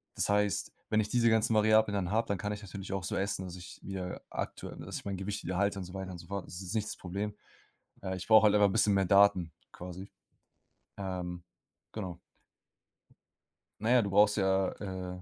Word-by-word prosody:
Das - - 0
heißt, 105 0 +1 0.2
wenn 110 - +3
ich 105 -1 0
diese 115 0 +3
ganzen 110 0 +3
Variablen 110 0 +4
dann 95 -3 -1
habe, 115 +2 +1
dann 100 - 0
kann 105 - -2
ich 105 - -7
natürlich 100 0 -7
auch 95 -2 -2
so 85 - -2
essen, 95 -1 -1
dass 90 -1 -7
ich 90 0 -10
wieder 95 -2 -5
aktuell - - -5
dass - - -7
ich - - -9
mein 100 -1 -2
Gewicht 100 +2 -4
wieder 90 +1 -2
halte 100 +1 +1
und 95 - -5
so 90 - -11
weiter 95 -1 -5
und 90 - -7
so 85 - -12
fort. 100 -1 -4
Das 85 - -8
ist 95 +1 -5
nicht 110 -1 0
das - - -5
Problem. 100 +3 -4 0.7
Äh, 95 -1 -2
ich 95 - -6
brauche 110 -1 +7
halt 105 0 +5
einfach 105 -1 +6
'n - - -3
bisschen 105 -2 +4
mehr 95 -1 +3
Daten 95 -3 +5 0.2
quasi. 90 +2 -8 0.9
Ähm. 90 -2 -4 0.5
Genau. 95 -6 -5 1.6
Na 110 - 0
ja, 125 -1 +6
du 100 - -2
brauchst 105 +1 +5
ja 95 -1 +2 0.4
äh, - - -11
100 Hz, 215 wpm, -31 LUFS, 95-105 Hz, 1.6 s, brauche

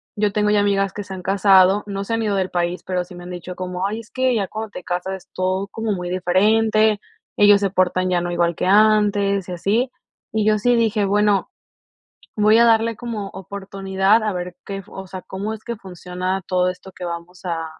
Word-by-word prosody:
yo 205 -1 +1
tengo 210 0 +2
ya 210 - +4
amigas 195 -1 +1
que 205 - -5
se 190 0 -8
han 180 - -9
casado, 195 0 +4
no 200 0 -3
se 230 - -4
han 225 - 0
ido 210 -2 0
del 190 -1 -1
país, 175 0 -1
pero 180 -1 -1
sí 180 0 -13
me 175 - -10
han 180 - -8
dicho 180 +1 -7
como: 185 +1 -3
"Ay 220 +3 -4
es 225 - -19
que 255 -1 +1
ya 200 -4 0
cuando 220 +2 -5
te 190 - -9
casas 180 +2 -3
es 190 - -14
todo 185 +1 -1
como 225 0 -2
muy 180 -2 -4
diferente, 215 +4 +3 0.4
ellos 205 -1 +6
se 200 -2 0
portan 185 -1 +1
ya 175 -1 +2
no 175 0 -3
igual 170 -1 +1
que - - -2
antes." 205 -2 +3
Y - - -4
así. 210 +9 0 0.4
Y 215 -1 0
yo 215 -1 +3
sí 245 +3 +3
dije: 220 -3 +2
"Bueno, 205 0 +2 0.9
voy 215 +1 +5
a 235 - +6
darle 230 0 +3
como 225 -4 -5
oportunidad 195 +2 0
a 215 - 0
ver 180 0 -5
qué 195 0 -5
o 190 0 -8
sea, 185 0 -8
cómo 200 +3 -5
es 220 - -12
que 235 -1 -4
funciona 185 0 -4
todo 180 -1 +1
esto 180 +1 -7
que 185 - -8
vamos 170 +1 -7
a, 165 -2 -2
195 Hz, 225 wpm, -21 LUFS, 180-210 Hz, 0.9 s, ellos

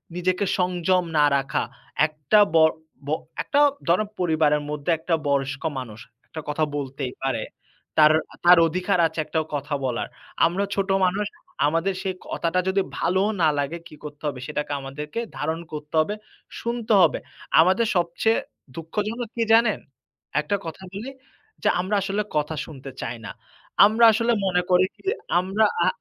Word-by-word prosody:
নিজেকে 180 +2 0
সংযম 180 0 +2
না 150 - +6
রাখা। 135 -1 -1 0.4
একটা 155 +7 +2 0.2
বড় 160 -1 +6 0.3
ব - - -4 0.3
একটা 285 - +1 0.3
ধরেন 180 +5 +3
পরিবারের 155 -4 +2
মধ্যে 150 +2 -2
একটা 165 +1 0
বয়স্ক 135 0 0 0.2
মানুষ 110 -4 -8 0.3
একটা 160 - -7
কথা 150 +1 0
বলতেই 135 -2 -4
পারে। 135 - -1 0.5
তার, 155 -1 +7 0.3
তার 175 +1 +9
অধিকার 180 +3 0
আছে 160 0 -7
একটা 160 - -1 0.2
কথা 145 +1 -4
বলার। 125 -2 -2 0.4
আমরা 175 +4 +1
ছোট 195 0 -1 0.2
মানুষ। 200 +3 -1 0.4
আমাদের 165 +5 +1
সেই 190 -2 -2
কথাটা 170 +2 0
যদি 195 +1 +2 0.2
ভালো 185 +2 +2 0.2
না 160 - +5
লাগে, 145 +4 -2
কী 160 - -13
করতে 150 0 -9
হবে? 140 -3 -3
সেটাকে 150 -1 -3
আমাদেরকে 150 +8 -6 0.2
ধারণ 160 +1 -2
করতে 150 +1 -6
হবে, 205 +7 -2 0.5
শুনতে 235 -1 -1
হবে। - - +4 0.4
আমাদের 190 +7 +3
সবচেয়ে 175 +6 +1 0.4
দুঃখজনক 210 +8 -3
কী 230 - +1
জানেন? 225 -2 +4 0.6
একটা 200 - -1
কথা 165 +3 -7
বলি, 215 +7 -5 0.5
যে - - +4
আমরা 190 +4 0
আসলে 195 +2 -1 0.2
কথা 150 +1 -1
শুনতে 135 -3 -9
চাই 120 - -4
না। - - -6 0.5
আমরা 220 +3 +5
আসলে 230 +2 +2
মনে 180 -1 +2
করি 180 0 +5
কী, - - -23 0.4
আমরা 195 +4 +2 0.2
আ - - +3
170 Hz, 155 wpm, -24 LUFS, 150-195 Hz, 0.6 s, তার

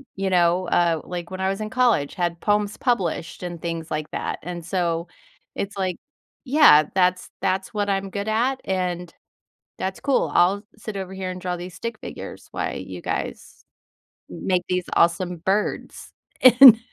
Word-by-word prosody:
you 195 0 -1
know, 180 0 +2
uh, 170 -3 +2
like, 175 -1 -6
"when 185 - -6
I 190 0 +1
was 195 +2 -3
in 215 - -3
college, 235 - +2
had 175 -1 -1
poems 210 0 +1
published 190 -9 -1
and 175 -2 -6
things 165 -1 -4
like 155 0 -3
that." - - -3
And 175 0 -6
so, 170 -1 -1 0.5
it's 200 0 -4
like 185 -2 -1 0.5
yeah, 265 - +7
"that's 180 -1 +2
that's 190 0 -1
what 205 -1 -1
I'm 195 0 -1
good 200 +2 -4
at, 245 +5 +1
and 180 -2 -2 0.6
that's 190 0 -4
cool. 280 -2 +1
I'll 190 +3 +4
sit 215 -2 -7
over 190 -1 -5
here 190 -1 -4
and 180 0 -6
draw 180 -1 -2
these 175 0 -8
stick 230 +3 -5
figures - - -9
while - - -3
you - - -7
guys - - -5 0.7
m - - -8
make 180 -2 +2
these 180 -1 0
awesome 175 +1 +2
birds." 195 +5 -2 0.3
And 250 -2 +10
185 Hz, 170 wpm, -23 LUFS, 175-205 Hz, 0.7 s, And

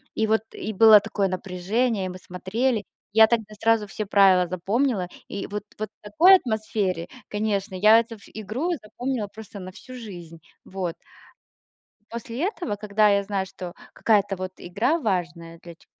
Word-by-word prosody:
И 220 - +1
вот, 220 0 +3
и 215 - -5
было 220 +1 +8
такое 205 -1 -1
напряжение, 190 +4 -1
и - - -3
мы 180 - -7
смотрели. 205 +6 -2 0.3
Я 220 0 +8
тогда 220 -2 -1
сразу 225 -2 +3
все 215 +2 -4
правила 195 -3 +5
запомнила, 195 +3 0 0.2
и 200 - -5
вот 205 0 -5 0.2
вот 215 -1 -3
такой 325 - +6
атмосфере, 215 - -1 0.2
конечно, 205 -2 -2
я 215 +4 +7
эту 230 0 -4
ф 205 - -18
игру 220 - -3
запомнила 235 +1 -3
просто 210 0 -11
на 185 0 -8
всю 255 +7 -12
жизнь. 175 -8 -9 0.3
Вот. 185 -3 -4 1.2
После 235 +4 -5
этого, 350 - -3
когда 210 +1 +2
я 200 0 +3
знаю, 195 -1 -2
что 180 -2 -8 0.2
какая-то 205 -3 +2
вот 185 0 -5
игра 215 - 0
важная 170 - -3
для 170 -1 -10
ч - - -25
210 Hz, 160 wpm, -24 LUFS, 185-225 Hz, 1.2 s, было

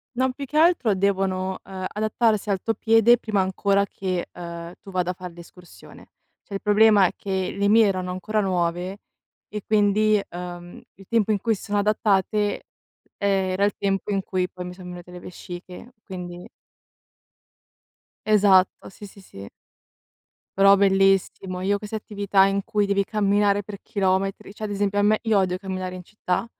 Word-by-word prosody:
Non, 260 +1 +1
più 280 - -8
che 300 +3 -4
altro 315 - +4
devono, 190 -1 -1
ehm, 190 -1 -7
adattarsi 215 0 0
al 195 -2 +1
tuo 225 - -1
piede 225 +2 +4
prima 215 -4 -2
ancora 195 +1 +1
che, 185 -3 -4
ehm, 170 0 -8
tu 195 - -12
vada 180 -1 0
a - - -6
far 180 -1 -9
l'escursione. 175 +1 -15 0.3
Cioè, 200 - -8
il 195 - -4
problema 210 -1 +5
è - - +1
che 190 -2 -3
le 200 0 +2
mie 225 +1 +6
erano 185 -2 -2
ancora 200 +4 -1
nuove 180 0 -1 0.5
e 210 -1 -6
quindi, 210 0 +3
ehm, 175 0 -8
il 195 - -16
tempo 225 -2 +1
in 205 - +1
cui 225 +2 0
s - - -12
sono 205 -1 -2
adattate, 205 0 +1 0.5
ehm, 195 -2 +1
era 185 +2 0
il 205 - +2
tempo 195 +1 -1
in 195 -1 0
cui 185 -1 -2
poi 180 -1 -8
mi 180 - -7
son 180 -1 -11
venute 180 0 -10
le 180 - -9
vesciche, 180 +6 -10
quindi 180 -2 -8 1.8
Esatto, 200 -3 +3
sì, 205 - -12
sì, 200 - -16
sì. 100 - -11 1.1
Però 195 0 +7
bellissimo! 195 -1 +2
Io 200 +2 +1
queste 210 +1 -7
attività 200 -2 +1
in 195 0 0
cui 210 -1 +1
devi 200 0 +1
camminare 205 -1 +1
per 200 0 -9
chilometri, 195 0 -1
cioè 215 +1 -5
ad 205 - -4
esempio 205 0 0
a - - +4
me 210 +1 +3
io 220 -2 +2
odio 185 -1 0
camminare 185 -1 -5
in 180 - -9
città, 180 +1 -3
195 Hz, 175 wpm, -23 LUFS, 185-210 Hz, 1.8 s, Però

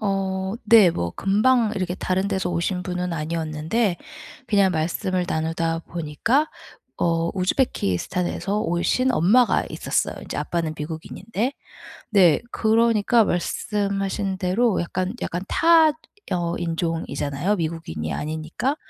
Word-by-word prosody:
어 195 -2 -1 0.3
네 215 -6 +8
뭐 85 - -2
금방 215 +3 +3
이렇게 185 -3 -2
다른 190 +1 -1
데서 190 -3 -1
오신 175 +2 -1
분은 180 0 -3
아니었는데 165 +5 -1 0.5
그냥 200 -4 +3
말씀을 180 +3 -1
나누다 165 +1 -1
보니까 175 - 0 0.5
어 165 0 +1
우즈베키스탄에서 185 - -1
오신 225 +7 +1
엄마가 235 +7 +4
있었어요, - - -1
이제 - - -6
아빠는 165 -2 -2
미국인인데. 185 - -4 0.6
네 180 -8 +5
그러니까 225 0 +3
말씀하신 195 +1 -1
대로 195 +4 +1
약간 185 +2 -2
약간 175 +1 -3
타 330 -2 +5 0.4
어 170 -1 -1
인종이잖아요. 165 0 -2
미국인이 155 - -4
아니니까. 160 - -2
180 Hz, 290 characters per minute, -23 LUFS, 165-210 Hz, 0.6 s, 네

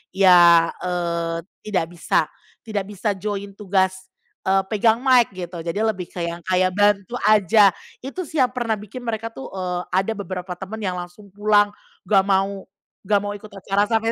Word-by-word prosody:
ya, 175 -3 +6
eee, 170 -2 -2 0.3
tidak 190 -6 0
bisa - - +2 0.5
tidak 210 -3 -2
bisa 205 +1 -2
join 200 0 -5
tugas, 190 -1 0 0.4
eee, 195 0 +3
pegang 220 +2 +2
mic 255 -3 +4
gitu. 180 -1 -7
Jadi 170 +4 -3
lebih 215 -5 -1
ke - - -8
yang 170 0 -4
kayak 185 0 +2
bantu 205 +1 +2
aja. 210 -1 +5 0.3
Itu 325 +6 -5
sih 315 - -5
yang 250 - 0
pernah 240 -3 -1
bikin 210 +4 -9
mereka 230 -1 -4
tuh, 270 - -8
eee, 180 -2 -3
ada 190 +4 0
beberapa 185 -3 -5
temen 200 +3 -6
yang 185 - -1
langsung 175 +3 -11
pulang, 205 0 +3 0.3
nggak 195 -2 +4
mau 195 0 0 0.4
nggak 205 0 +4
mau 205 - -3
ikut 205 +1 -10
acara 200 0 -1
sampai 225 0 +1
200 Hz, 170 wpm, -22 LUFS, 185-215 Hz, 0.5 s, ya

